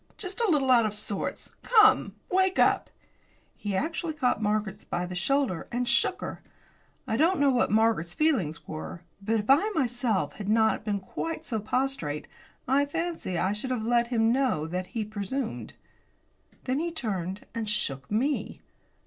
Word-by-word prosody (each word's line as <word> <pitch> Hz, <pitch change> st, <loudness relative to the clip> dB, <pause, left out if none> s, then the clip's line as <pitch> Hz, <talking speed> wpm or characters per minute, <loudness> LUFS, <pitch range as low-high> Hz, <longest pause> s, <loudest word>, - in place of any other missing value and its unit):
Just 395 Hz, +3 st, -5 dB
a 455 Hz, -, +2 dB
little 275 Hz, -5 st, +3 dB
out 235 Hz, -3 st, +6 dB
of 210 Hz, -, -4 dB
sorts. 210 Hz, -1 st, -4 dB
Come, 430 Hz, -3 st, +5 dB, 0.2 s
wake 375 Hz, 0 st, +3 dB
up!" -, -, +3 dB, 0.7 s
He 205 Hz, -2 st, -3 dB
actually 320 Hz, -, -2 dB
caught 255 Hz, -6 st, +1 dB
Margaret 210 Hz, -1 st, -1 dB
by 175 Hz, -, -1 dB
the 180 Hz, -, -6 dB
shoulder 225 Hz, 0 st, 0 dB
and 245 Hz, +1 st, -1 dB
shook -, -, +2 dB
her. -, -, -6 dB, 0.6 s
I 220 Hz, -, -1 dB
don't 340 Hz, +6 st, +3 dB
know 285 Hz, -1 st, +4 dB
what 250 Hz, -, +2 dB
Margaret's 215 Hz, -6 st, +2 dB
feelings 230 Hz, -, 0 dB
were, 160 Hz, +2 st, -6 dB, 0.2 s
but 220 Hz, +3 st, +1 dB
if 210 Hz, -, -12 dB
I 300 Hz, +11 st, +5 dB
myself 245 Hz, -, 0 dB
had 205 Hz, -1 st, -4 dB
not 220 Hz, 0 st, +3 dB
been 205 Hz, -2 st, -1 dB
quite 325 Hz, +11 st, -5 dB
so 225 Hz, -4 st, -2 dB
prostrate, 215 Hz, -, -2 dB, 0.4 s
I 280 Hz, +3 st, +3 dB
fancy 330 Hz, -, -3 dB
that 175 Hz, -, +1 dB
I 195 Hz, -, +1 dB
should 210 Hz, +5 st, -5 dB
have 250 Hz, -4 st, -1 dB
let 235 Hz, 0 st, +3 dB
him 230 Hz, -2 st, +2 dB
know 255 Hz, -, +1 dB
that 180 Hz, +3 st, -3 dB
he 225 Hz, -3 st, -3 dB
presumed. 215 Hz, +4 st, -4 dB, 0.9 s
Then 260 Hz, +2 st, 0 dB
he 340 Hz, +2 st, -1 dB
turned 195 Hz, -, -3 dB
and 225 Hz, -2 st, -3 dB
shook 140 Hz, -10 st, -2 dB
me. 260 Hz, +8 st, -1 dB
230 Hz, 170 wpm, -28 LUFS, 200-275 Hz, 0.9 s, out